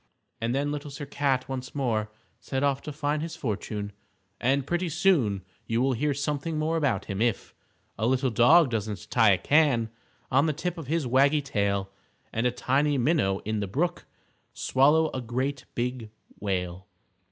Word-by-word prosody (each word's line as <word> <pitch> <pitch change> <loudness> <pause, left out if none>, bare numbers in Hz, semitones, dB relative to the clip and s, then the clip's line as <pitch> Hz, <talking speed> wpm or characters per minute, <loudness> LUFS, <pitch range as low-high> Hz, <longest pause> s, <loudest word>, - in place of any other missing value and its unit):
And 115 +2 0
then 145 +1 0
Little 145 0 -5
Sir 145 +1 -7
Cat 135 -2 0
once 130 0 -6
more 110 -6 0 0.3
set 135 0 -3
off 140 -1 +1
to 150 - -6
find 150 +1 -1
his 165 +1 -5
fortune, 105 -3 -4 0.5
and 135 +2 +1
pretty 175 +3 -1
soon 145 - +2 0.2
you 115 +1 0
will 130 +1 +2
hear 145 +5 0
something 150 +3 -2
more 155 +2 0
about 145 -6 0
him, 100 0 -4
if 115 -3 0 0.5
_A 110 - +2
little 130 0 +1
dog 130 +6 +6
doesn't 105 -2 -4
tie 110 -4 +5
a - - +2
can 140 - +3 0.4
On 140 +5 +4
the 155 - +1
tip 170 +3 -3
of 155 - -8
his 160 0 0
waggy 140 +4 +3
tail, 100 -7 -1 0.4
And 115 +2 +1
a - - +1
tiny 140 +4 +1
minnow 120 - +1
in 110 0 -1
the 100 - -2
brook 170 - -2 0.5
Swallow 150 +4 +3
a 130 - -3
great 130 +4 -2
big 120 -2 -3 0.3
whale. 95 -1 -3
130 Hz, 175 wpm, -27 LUFS, 115-150 Hz, 0.5 s, dog